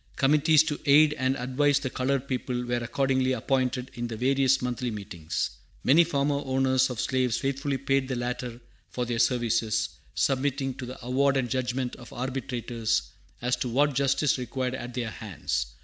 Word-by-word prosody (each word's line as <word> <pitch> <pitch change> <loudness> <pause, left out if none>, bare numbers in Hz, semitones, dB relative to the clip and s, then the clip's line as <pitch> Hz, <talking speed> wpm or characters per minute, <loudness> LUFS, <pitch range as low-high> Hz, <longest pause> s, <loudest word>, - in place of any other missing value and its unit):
Committees 150 +3 +5
to 150 -2 -3
aid 150 +2 +6
and 130 -1 0
advise 135 +3 +2
the 130 - -3
colored 135 +1 -1
people 125 -1 -2
were 120 0 0
accordingly 130 +2 +1
appointed 130 +1 -1
in 120 -2 -4
the 115 -2 -6
various 135 +2 +3
Monthly 125 0 -2
Meetings. 95 -7 -3 0.3
Many 155 +7 +6
former 140 -3 0
owners 130 0 +2
of 125 -4 -5
slaves 130 -3 +1
faithfully 135 +1 -1
paid 135 0 0
the 130 - -2
latter 120 0 -4 0.3
for 125 - -2
their 120 -1 -2
services, 115 -2 +1 0.3
submitting 135 0 0
to 130 -1 -7
the 130 - -7
award 135 +2 +2
and 130 -2 0
judgment 130 -1 -1
of 120 - -12
arbitrators 120 -3 -2 0.3
as 125 0 +2
to 125 - -2
what 145 +4 +2
justice 140 0 +2
required 125 +1 -2
at 125 -2 -6
their 120 -3 -2
hands. 90 - -3
130 Hz, 165 wpm, -27 LUFS, 120-135 Hz, 0.3 s, aid